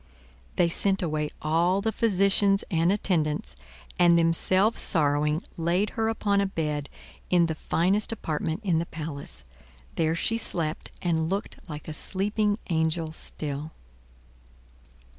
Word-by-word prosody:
They 175 - +3
sent 195 +3 +1
away 155 -2 -1
all 170 +5 +2
the 220 +2 0
physicians 200 -2 +3
and 165 +1 +3
attendants, 155 - 0 0.4
and 170 -1 +6
themselves 185 +6 +4
sorrowing 150 -1 +1
laid 175 +5 0
her 225 -1 -1
upon 205 -3 +1
a 200 - +1
bed 150 -6 -3 0.4
in 175 -2 +4
the 165 - -1
finest 185 +7 +1
apartment 160 -3 -3
in 175 -5 +2
the 170 - -3
palace. 145 - -6 0.5
There 160 0 +1
she 225 +6 -1
slept 165 -7 -2
and 160 -2 0
looked 195 -1 -5
like 150 -1 -7
a 155 - -5
sleeping 205 +5 0
angel 160 0 0
still. 150 -1 -5
170 Hz, 130 wpm, -26 LUFS, 155-195 Hz, 0.5 s, and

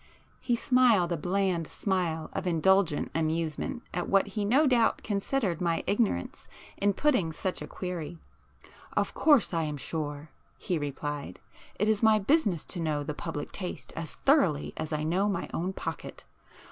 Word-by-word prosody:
He 240 - 0
smiled 235 -8 +3
a - - +2
bland 180 0 0
smile 175 -5 -2
of 185 - -3
indulgent 175 -1 +2
amusement 165 - -2
at 175 - -2
what 195 -1 +3
he 210 - -2
no 260 +10 +4
doubt 245 -4 +3
considered 200 - -1
my 170 -2 0
ignorance 205 - -1 0.3
in 200 0 +2
putting 250 - +2
such 185 +4 -3
a - - -5
query. 175 -2 -5 0.5
[p - - -19 0.3
6]"Of - - +1
course 290 - +4
I 165 - +1
am 150 -2 -3
sure,"—he 150 +3 -5
replied—"It 145 +7 -5
is 215 -1 +2
my 220 -1 +6
business 205 - +1
to 180 - -5
know 155 -3 -1
the 150 - -4
public 155 -1 -5
taste 185 -3 -6
as 165 -1 -3
thoroughly 230 - +2
as 155 - -5
I 150 0 -1
know 185 +6 +1
my 200 - -2
own 180 +3 -1
pocket. - - -6
180 Hz, 160 wpm, -29 LUFS, 160-210 Hz, 0.5 s, my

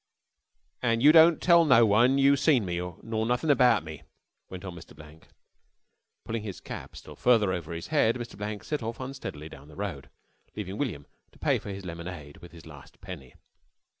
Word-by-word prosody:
"An' 115 -2 +1
you 145 +3 +8
don't 165 +1 +6
tell 170 -1 +5
no 130 -7 +5
one 120 +6 +4
you 140 +1 +5
seen 140 -6 +2
me 85 -1 -3 0.2
nor 110 -1 -2
nothing 125 +6 +1
abart 125 - +4
me," 80 -2 -9 0.5
went 95 +1 -9
on 90 - -6
Mr. 85 -2 -13
Blank. 75 +1 -15 1.0
Pulling 115 0 -3
his 100 -3 -7
cap - - -9
still - - -11
farther 110 -6 +3
over 85 -3 -5
his 85 0 -6
head, 140 -7 +2
Mr. 120 -1 -7
Blank 105 0 -6
set 150 -3 -3
off 115 +1 -5
unsteadily 130 - -7
down 70 -2 -13
the 75 - -15
road, 80 -10 -6 0.5
leaving 100 -1 -6
William 90 - -3 0.3
to - - -20
pay - - +1
for - - -9
his 95 -1 -7
lemonade 85 -4 -8
with 85 - -14
his 85 -1 -14
last 75 -3 -14
penny. 90 -10 -10
105 Hz, 190 wpm, -27 LUFS, 85-125 Hz, 1.0 s, you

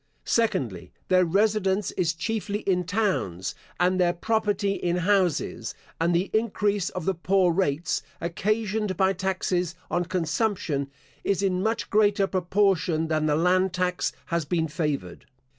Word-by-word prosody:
Secondly, 130 - 0 0.2
Their 185 -1 +5
residence 200 +1 +1
is 170 -2 0
chiefly 210 +2 -2
in 180 -2 0
towns, 185 - -1 0.3
and 185 +1 +2
their 175 -1 +3
property 205 +1 0
in 175 -3 -1
houses; 180 -2 0 0.2
and 170 +1 +2
the 180 +3 0
increase 205 -3 +1
of 180 -3 -5
the 190 - +2
poor 180 0 +2
rates, 165 -3 0 0.2
occasioned 210 +2 -1
by 190 0 +3
taxes 180 -2 -1 0.2
on 175 0 +1
consumption, 165 -4 -1 0.3
is 200 0 0
in 185 -2 +1
much 220 +3 -1
greater 205 -2 +4
proportion 185 -3 +1
than 155 -1 +1
the 150 - +2
land 180 +3 +2
tax 180 0 0
has 170 -1 -1
been 160 +1 0
favoured. 150 - -3
185 Hz, 140 wpm, -26 LUFS, 170-200 Hz, 0.3 s, Their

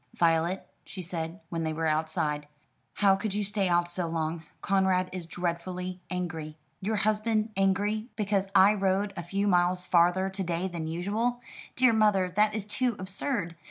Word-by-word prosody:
"Violet," 170 +2 +1 0.2
she 190 -2 -7
said, 165 +2 -5
when 165 -1 -2
they 160 -1 -1
were 160 +1 -2
outside, 155 -1 0 0.5
"how 195 -2 +5
could 200 +1 -3
you 210 - 0
stay 200 -1 0
out 175 0 +3
so 175 0 -3
long? 165 0 -2 0.2
Conrad 190 -1 +2
is 180 -3 -5
dreadfully 180 +1 -3
angry." 160 -4 -4 0.2
"Your 215 +3 -1
husband 215 +1 +1
angry 205 +4 +1
because 200 -2 0
I 195 +2 +7
rode 195 0 0
a 175 - -4
few 195 +4 -1
miles 180 -1 +2
farther 180 +2 +3
to 195 0 -4
day 175 +1 -1
than 170 -3 -4
usual? 210 +9 -1 0.4
Dear 255 -2 +5
mother, 210 -4 +3
that 210 +1 +3
is 215 -2 -3
too 235 +3 0
absurd. 190 -1 -3
185 Hz, 165 wpm, -28 LUFS, 170-205 Hz, 0.5 s, I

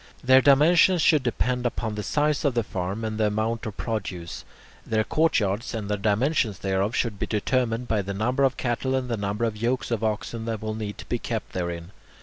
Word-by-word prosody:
Their 130 +1 +6
dimensions 165 +6 +5
should 155 -2 +5
depend 125 0 -1
upon 115 -2 -2
the 105 - -3
size 150 +6 0
of 140 -5 +1
the 120 - +2
farm 95 +3 -4
and 110 0 -3
the 110 - +3
amount 110 +2 -1
of 105 - -7
produce. 95 -7 -4 0.4
Their 110 -1 0
courtyards 115 -9 +1
and 105 -3 -4
the - - +2
dimensions 110 +2 +1
thereof 95 +3 -1
should 110 -5 -1
be - - -2
determined 115 +2 0
by 110 -2 +1
the 100 0 -5
number 125 +6 +1
of 135 -1 +2
cattle 130 +2 -1
and 130 -1 -2
the 115 - 0
number 100 +2 -1
of 110 -2 -2
yokes 120 +3 -1
of 115 -2 -1
oxen 110 +1 -2
that 115 -2 -2
will 110 0 -2
need 105 -2 -5
to - - -9
be 120 - -2
kept 115 -1 -4
therein. 85 -1 -4
115 Hz, 210 wpm, -25 LUFS, 105-125 Hz, 0.4 s, Their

